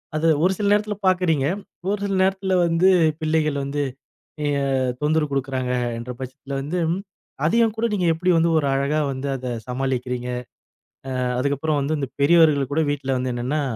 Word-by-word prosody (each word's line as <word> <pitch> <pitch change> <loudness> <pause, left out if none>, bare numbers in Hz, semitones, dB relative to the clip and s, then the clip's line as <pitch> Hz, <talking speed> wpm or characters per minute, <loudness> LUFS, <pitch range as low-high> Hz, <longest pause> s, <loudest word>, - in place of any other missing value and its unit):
அதை 155 +1 +1 0.2
ஒரு 185 - +4
சில 205 - 0
நேரத்துல 210 0 0
பாக்கறீங்க. 180 -7 +2 0.5
ஒரு 205 - -2
சில 195 -1 -1
நேரத்துல 190 0 0
வந்து 170 +2 +3 0.3
பிள்ளைகள் 155 -2 +1
வந்து 145 +1 -2 0.6
அ. - - 0 0.6
தொந்தரவு 150 0 +1
குடுக்கறாங்க 130 -2 -1 0.3
என்ற 120 +2 -6
பட்சத்துல 130 +1 -8
வந்தும், 165 +3 -1 0.5
அதையும் 225 +5 +3
கூட 225 - 0
நீங்க 185 -4 0
எப்படி 175 +3 -1
வந்து 165 +1 +3
ஒரு 145 -3 +1
அழகா 140 +3 +1
வந்து 135 +1 -4
அதைச் 125 -3 -5
சமாளிக்கிறீங்க. 125 -1 -2 0.9
அ. - - +1 0.2
அதுக்கப்புறம் 145 +3 0
வந்து 150 +3 -1
இந்த 135 - -3
பெரியவர்கள் 145 -3 +4
கூட 160 - +2
வீட்ல 135 -2 -1
வந்து 125 0 -2
என்னன்னா 130 +5 -1
150 Hz, 155 wpm, -22 LUFS, 135-170 Hz, 0.9 s, ஒரு